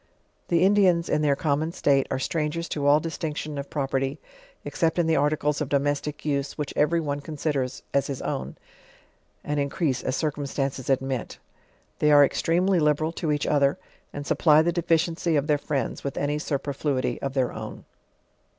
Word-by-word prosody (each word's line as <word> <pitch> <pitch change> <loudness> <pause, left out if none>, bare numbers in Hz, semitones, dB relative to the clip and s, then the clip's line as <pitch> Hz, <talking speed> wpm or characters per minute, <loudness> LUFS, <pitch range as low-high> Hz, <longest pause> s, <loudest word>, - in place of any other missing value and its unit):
The 170 0 +3
Indians, 185 -4 +4
in 150 - +1
their 145 -2 +3
common 155 +1 -1
state, 140 -6 +2
arc 130 - -2
strangers 160 +2 -2
to 145 -2 -1
all 145 +1 +6
distinction 155 -2 -4
of 140 - -6
property, 135 -1 -2 0.5
except 165 -1 0
in 175 - +3
the 160 0 +2
articles 150 0 +1
of 145 - -2
domestic 145 +1 -1
use, 140 -2 -1
which 150 -2 -4
every 160 +3 +2
one 145 -3 -2
considers 145 -3 -3
as 140 - +2
his 135 -2 -4
own, - - -3 0.9
and 150 0 -2
increase 140 -1 -1
as 130 - -2
circumstances 140 -3 -2
admit. 135 -2 -1 0.6
They 150 - +3
are 145 -1 +8
extremely 175 +6 +1
liberal 150 +1 +2
to 165 -2 -2
each 145 -1 0
other 140 -1 +2 0.3
and 145 0 -6
eupplv 155 +1 +4
the 175 - +2
deficiency 170 -1 +1
of 145 -1 +1
their 150 -2 +2
friends 145 -2 -3
with 140 - -4
any 145 +1 0
su 150 -2 -1
perfluity 135 -3 -2
of 135 -1 -3
tl.eir 130 -3 +1
own. - - -8
150 Hz, 170 wpm, -25 LUFS, 140-160 Hz, 0.9 s, are